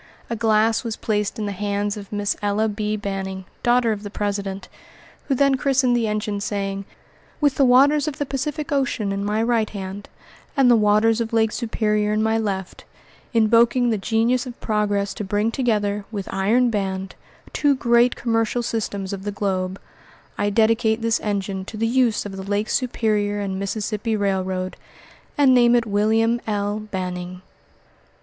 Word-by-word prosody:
A - - 0
glass 225 0 +2
was 230 -2 -3
placed 210 -1 -1
in 215 - -2
the 205 - -2
hands 205 +1 -2
of 200 -2 -9
Miss 205 -1 -1
Ella 205 +2 +1
B. 210 0 -2
Banning, 190 -2 -4 0.2
daughter 240 -1 +3
of 210 -2 -3
the 205 - -6
president, 200 -1 -3 0.6
who 275 - +1
then 275 +1 +3
christened 265 -2 +2
the 235 -2 +1
engine, 210 -1 -2
saying: 195 -1 -3 0.5
"With 290 -3 +3
the 275 - +3
waters 280 +4 +5
of 295 - -3
the 290 - -1
Pacific 295 +3 -3
Ocean 265 -7 0
in 195 0 -2
my 210 +2 0
right 230 -2 +1
hand, 195 0 -7 0.5
and 260 -3 +5
the - - +7
waters 215 +1 +3
of 230 0 -4
Lake 220 -1 +3
Superior 210 -3 0
in 215 +1 +1
my 220 0 +2
left, 195 -4 -4 0.5
invoking 235 +2 +4
the 220 - +1
Genius 235 +5 +1
of 245 - -9
Progress 205 -2 0
to - - -5
bring 205 +3 0
together, 210 -5 0
with 200 -3 -5
iron 225 +6 +2
band, 190 -2 -3 0.4
two 290 -2 +3
great 240 -1 +3
commercial 230 0 0
systems 205 -4 -3
of 195 - -5
the 205 +1 -4
globe, 190 -2 -2 0.6
I 205 0 0
dedicate 220 +1 +2
this 230 -1 +2
engine 195 -2 -2
to 215 - -8
the 225 - 0
use 235 -2 +2
of 195 -1 -6
the - - -5
Lake 205 +2 -1
Superior 210 -5 0
and 195 -2 -3
Mississippi 215 +2 -2
Railroad, 190 -2 -1 0.6
and 275 -3 +5
name 240 -1 +5
it 235 -1 +2
William 225 +3 +2
L. 205 0 -1
Banning." 180 -1 -5
215 Hz, 170 wpm, -22 LUFS, 200-235 Hz, 0.6 s, the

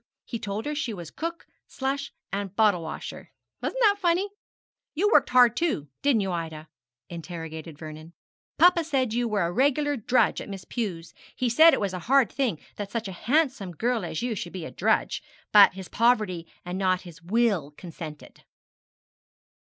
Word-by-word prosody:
He 230 - -5
told 210 0 -4
her 295 - -2
she 265 -7 -3
was 170 -4 -8
cook, 335 +1 -5 0.2
slush, 275 +1 -3 0.2
and 200 -1 -3
bottle 210 -5 +4
washer. 160 -1 -7 0.3
Wasn't - - -3
that 405 -2 +4
funny? 360 +2 +1 0.7
You 410 +7 +2
worked - - +5
hard 245 -2 +6
too, 300 - -1
didn't 275 -6 +3
you, 190 -1 -1
Ida?' 160 -2 -5 0.4
interrogated 165 -2 -7
Vernon. 155 +1 -10 0.4
'Papa 350 0 +6
said 265 -7 0
you 240 0 +1
were 210 -4 0
a 170 - -1
regular 285 +5 +2
drudge 245 +1 +2
at - - -8
Miss 195 -2 -7
Pew's. 185 -9 -4 0.2
He 255 -2 0
said 320 +8 +7
it - - -3
was 200 -3 -1
a 185 - -3
hard 270 -5 +5
thing 245 - -1 0.2
that 205 -1 -5
such 225 -1 -3
a - - -5
handsome 245 - 0
girl 230 +5 0
as 160 +3 -4
you 245 -2 -1
should 175 -4 -6
be 180 -4 -5
a - - -7
drudge, - - +1 0.3
but 205 -3 +8
his 190 -2 -7
poverty 215 -8 +1 0.2
and 180 +1 -4
not 185 -1 +2
his 175 -1 -13
will 200 -4 +1
consented.' 160 -4 -10
210 Hz, 175 wpm, -26 LUFS, 175-265 Hz, 0.7 s, but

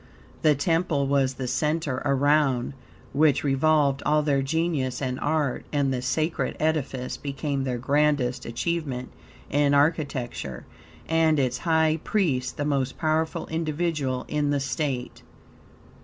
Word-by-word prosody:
The 150 -1 +4
temple 165 -1 +1
was 135 -1 +1
the 130 -1 -4
center 150 +1 -1
around 140 -2 +2 0.4
which 150 -1 +3
revolved 140 0 +2
all 150 0 +2
their 140 -2 +2
genius 140 -3 -1
and 130 -2 -2
art, 145 -3 0
and 140 -2 +1
the 125 - -2
sacred 155 +5 -1
edifice 140 -5 -1
became 140 -1 -3
their 125 -2 -1
grandest 140 -1 +1
achievement 130 0 -3 0.4
in 145 0 +3
architecture, 140 - -1 0.4
and 160 -1 +3
its 125 -3 0
high 160 0 +3
priest 140 -12 0
the 145 - -1
most 135 -3 -1
powerful 160 0 0
individual 155 -5 -1
in 150 -1 0
the 145 -1 +1
state. 135 -2 -3
145 Hz, 125 wpm, -25 LUFS, 130-155 Hz, 0.4 s, The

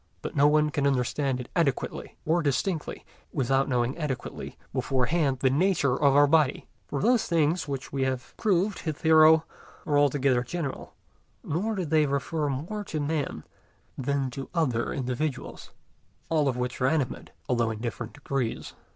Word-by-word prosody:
But - - -5
no 145 0 +5
one 150 0 +3
can 140 -1 +1
understand 135 0 0
it 125 - -7
adequately 145 -7 -1
or 165 +2 +2
distinctly 155 +3 -2 0.3
without 135 0 +1
knowing 125 0 0
adequately 135 -6 -5 0.2
beforehand 135 +2 +1
the 130 - +3
nature 150 -4 +2
of 140 -1 +3
our 145 0 +7
body; 150 -1 +2 0.2
for 140 - -3
those 245 0 +3
things 165 0 +1
which 135 -2 -5
we 135 - -1
have 130 -2 -2
proved 200 -1 +1
hitherto 160 0 +5 0.4
are 145 - +2
altogether 140 -3 +3
general, 140 +2 -5 0.5
nor 205 +9 -1
do 185 -3 -2
they 155 -1 +3
refer 140 +2 -1
more 165 +11 -4
to 155 - -3
man 145 0 -2 0.5
than 135 0 -1
to 135 +2 -7
other 125 -9 0
individuals, 130 +2 -3 0.6
all 155 -3 +2
of 130 -2 0
which 125 0 -3
are 130 - +4
animate, 140 -3 -1 0.2
although 120 -2 +1
in 110 - -4
different 115 -1 -5
degrees. 130 -3 -3
140 Hz, 155 wpm, -27 LUFS, 130-160 Hz, 0.6 s, our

